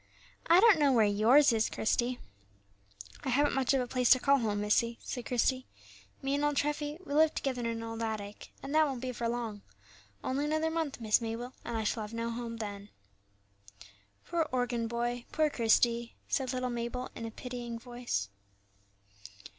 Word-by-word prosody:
"I 340 +2 +7
don't 420 -5 +6
know 285 -2 +4
where 230 -4 +5
yours 230 +7 +5
is, 220 0 +1
Christie." 240 +3 0 1.1
"I - - -2
haven't 285 +3 +2
much 265 -2 +1
of 265 - +2
a 250 - -3
place 250 -1 +1
to 255 - +7
call 280 +2 +4
home, 210 -3 -1
missie," 230 +3 +1
said 245 -2 -5
Christie; 255 +1 +1 0.6
"me 270 +1 0
and 285 +1 0
old 295 0 +1
Treffy, 295 +1 -1
we 285 - -5
live 310 +1 +4
together 260 -2 -2
in 235 - -2
an 230 0 -3
old 225 0 -5
attic, 210 -2 -5
and 275 - -5
that 310 0 +5
won't 265 -4 -4
be 255 0 -3
for 235 -1 -2
long, 230 -4 -4 0.6
only 275 +3 -1
another 310 +1 0
month, 320 -5 -2
Miss 220 0 +2
Mabel, 230 +2 -4
and 235 -1 -3
I 220 - -1
shall 220 +1 -1
have 215 +2 -6
no 230 0 -2
home 230 0 -5
then." 205 -2 -6 1.4
"Poor 330 -2 -1
organ 245 -2 0
boy, 240 +1 -2
poor 310 -1 +2
Christie!" 235 0 +2
said 260 -2 -1
little 255 -1 -2
Mabel, 240 +1 -4
in 230 - -6
a - - -5
pitying 240 0 -6
voice. 240 - -4
245 Hz, 185 wpm, -31 LUFS, 230-275 Hz, 1.4 s, I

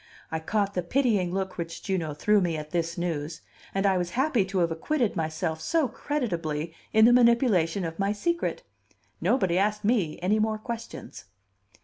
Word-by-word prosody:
I 160 - -1
caught 200 +4 -1
the 180 - 0
pitying 205 -2 +1
look 190 -1 -3
which 165 0 -5
Juno 170 -6 -2
threw 210 +8 +3
at 200 - +3
me 170 -3 0
at 150 0 -7
this 170 0 -1
news, 160 -2 -3 0.3
and 195 +1 -1
I 190 -2 +3
was 175 -1 -2
happy 265 -6 +3
to 190 0 -4
have 170 -2 +2
acquitted 235 - 0
myself 160 -1 -2
so 325 - +1
creditably 170 - -3 0.2
in 220 0 +6
the 240 - +7
manipulation 235 -8 +3
of 165 +2 -6
my 195 +1 +1
secret: 340 - -1 0.6
nobody 190 -8 +2
asked 210 +1 0
me 205 -9 +1
any 200 +5 +1
more 215 0 +1
questions! 225 - -7
190 Hz, 175 wpm, -27 LUFS, 165-220 Hz, 0.6 s, the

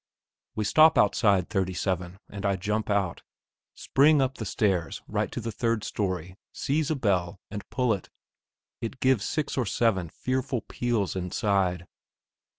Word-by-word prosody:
We 110 - -1
stop 155 +9 +6
outside 100 -2 +3
37, 95 -1 -1
and 100 -1 -8
I 100 -1 +2
jump 105 +4 -2
out, 100 -4 0 0.5
spring 145 +2 +4
up 135 0 0
the 110 - -3
stairs 95 -4 0
right - - -1
to - - -4
the 115 0 -4
third 115 0 -1
storey, 90 -2 -3
seize 150 +2 -1
a 155 - +1
bell, 95 -8 0
and 105 -1 -7
pull 125 -3 +1
it. 100 - -6 0.7
It 115 +3 -5
gives 130 -6 +3
six 155 -4 -1
or 120 - 0
seven 95 -4 +1
fearful 130 +3 -2
peals 115 -7 -1
inside. 95 -1 0
105 Hz, 150 wpm, -27 LUFS, 95-125 Hz, 0.7 s, stop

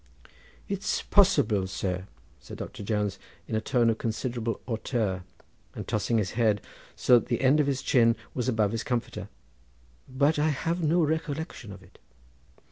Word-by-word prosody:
"It's 200 +2 -1
possible, 140 - +4
sir," 95 0 -3 0.3
said - - -10
Doctor - - -7
Jones 105 -1 -1 0.3
in - - -6
a 110 - +1
tone 120 +1 +2
of 110 - -4
considerable 115 0 -2
hauteur, 110 -5 -1 0.5
and - - -6
tossing 110 +2 0
his 100 -3 0
head 110 -3 +2 0.4
so 125 -1 +5
that - - -10
the 120 -2 -1
end 135 +3 +5
of 145 - +3
his 135 -2 -1
chin 115 -2 +4 0.2
was 125 0 -1
above 110 -4 +2
his 115 -1 -2
comforter, 120 -5 -3 0.8
"but 140 +4 +2
I 155 +1 +3
have 165 +4 -1
no 165 +2 +3
recollection 155 - -3
of 100 -1 -11
it." 85 - -20
120 Hz, 160 wpm, -28 LUFS, 105-145 Hz, 0.8 s, so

